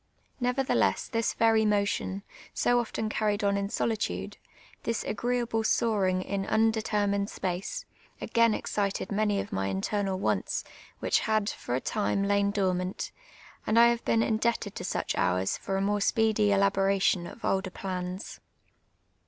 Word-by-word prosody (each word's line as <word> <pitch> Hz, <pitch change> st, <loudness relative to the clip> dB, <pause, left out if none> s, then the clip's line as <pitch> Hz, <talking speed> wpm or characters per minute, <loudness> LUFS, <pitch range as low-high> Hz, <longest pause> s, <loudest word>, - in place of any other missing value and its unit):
Never 250 Hz, +2 st, +1 dB
theless -, -, +1 dB
this 230 Hz, -2 st, 0 dB
ver)' 225 Hz, -1 st, +4 dB
motion, 200 Hz, -2 st, 0 dB, 0.3 s
so 245 Hz, 0 st, +3 dB
often 225 Hz, -1 st, -2 dB
carried 210 Hz, -1 st, 0 dB
on 200 Hz, 0 st, +2 dB
in 200 Hz, 0 st, -1 dB
solitude 220 Hz, -1 st, -2 dB, 0.2 s
— -, -, -25 dB
this 230 Hz, -1 st, -2 dB
aji^ieeahle 235 Hz, 0 st, -1 dB
soaring; 195 Hz, -5 st, +1 dB
in 200 Hz, 0 st, -2 dB
undetermined 215 Hz, -2 st, +1 dB
s])ace 190 Hz, -, -4 dB, 0.2 s
— -, -, -31 dB
a«;ain 230 Hz, -2 st, +3 dB
excited 200 Hz, -1 st, -2 dB
many 205 Hz, 0 st, +1 dB
of -, -, -5 dB
my 95 Hz, 0 st, -1 dB
internal 190 Hz, -, -1 dB
wants, 190 Hz, -, -1 dB, 0.4 s
which -, -, +2 dB
had, 215 Hz, -1 st, +2 dB
for 120 Hz, -, -4 dB
a -, -, +1 dB
time, 200 Hz, +3 st, 0 dB
lain 200 Hz, 0 st, +2 dB
dormant; 185 Hz, -2 st, -1 dB, 0.6 s
and 215 Hz, -, +2 dB
i 235 Hz, 0 st, +8 dB
have 235 Hz, 0 st, -1 dB
hecn 225 Hz, 0 st, +2 dB
indchtc 235 Hz, 0 st, +1 dB
<l 205 Hz, -, -6 dB
to -, -, -7 dB
such -, -, -2 dB
hours 90 Hz, +1 st, +1 dB
for 195 Hz, -, -2 dB
a -, -, 0 dB
more 205 Hz, +1 st, +1 dB
si>cedy 220 Hz, 0 st, +2 dB
eliih')ration 195 Hz, -2 st, +2 dB
of -, -, -9 dB
older 190 Hz, 0 st, 0 dB
j)l;uis. 185 Hz, 0 st, -5 dB
205 Hz, 155 wpm, -28 LUFS, 195-225 Hz, 0.6 s, i